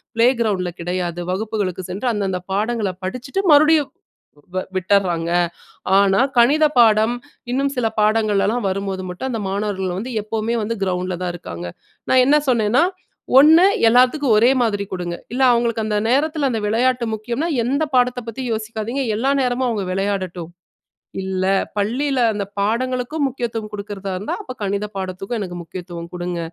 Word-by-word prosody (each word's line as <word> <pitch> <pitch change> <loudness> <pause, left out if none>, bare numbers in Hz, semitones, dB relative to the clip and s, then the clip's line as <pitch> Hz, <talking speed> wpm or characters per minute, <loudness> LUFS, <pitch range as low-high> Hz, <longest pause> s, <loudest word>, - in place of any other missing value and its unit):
Play 230 +2 +5
கிரவுண்ட்ல 185 -5 0
கிடையாது, 175 -1 -3
வகுப்புகளுக்கு 195 -2 -2
சென்று 210 +7 -3
அந்தந்தப் 190 -3 -3
பாடங்கள 215 -1 0
படிச்சுட்டு 255 - -3
மறுபடியும் 300 -2 +5 0.6
வ 185 - +1
விட்டறாங்க. 185 -3 +1 0.7
ஆனா, 195 +1 +4 0.2
கணித 285 +6 +5
பாடம் 220 0 +5 0.4
இன்னும் 275 +2 0
சில 240 -2 +1
பாடங்களலாம் 215 +1 +2
வரும் 195 +1 -2
போது 190 0 -4
மட்டும் 180 +9 -5
அந்த 225 -3 -3
மாணவர்கள் 190 -2 -2
வந்து 245 +4 -5
எப்பவுமே 220 +2 -2 0.3
கிரவுண்ட்ல 180 -1 -2
தான் 180 -1 -2
இருக்காங்க. 90 - -7 0.4
நான் 255 -1 +6
என்ன 295 +2 +5
சொன்னேன்னா, 235 +4 +3 0.6
1 320 +5 +7 0.2
எல்லாத்துக்கும் 255 0 +4
ஒரே 240 +4 +5
மாதிரி 205 -3 0
குடுங்க. 175 -2 -3 0.2
இல்ல 265 - 0
அவங்களுக்கு 235 -2 0
அந்த 210 -1 0
நேரத்துல 290 0 +1
அந்த 225 - -1
விளையாட்டு 245 +2 +1
முக்கியம்னா, 240 +10 -3 0.2
எந்தப் 280 +1 -1
பாடத்த 250 0 +2
பத்தியும் 235 +1 -4
யோசிக்காதீங்க, 220 +4 -3
எல்லா 270 +5 +1
நேரமும் 250 0 0
அவங்க 205 -4 -2
விளையாடட்டும். 185 -4 -3 0.7
இல்ல 190 0 -2 0.3
பள்ளில 255 +7 0
அந்தப் 200 -1 -5
பாடங்களுக்கும் 255 +7 -1
முக்கியத்துவம் 230 -4 -4
குடுக்குறதா 200 -1 -5
இருந்தா, 200 - -3
அப்ப 255 - -7
கணித 200 +1 -1
பாடத்துக்கும் 195 +4 -4
எனக்கு 180 -3 -5
முக்கியத்துவம் 170 -1 -8
குடுங்க. 175 0 -3
215 Hz, 140 wpm, -20 LUFS, 190-250 Hz, 0.7 s, 1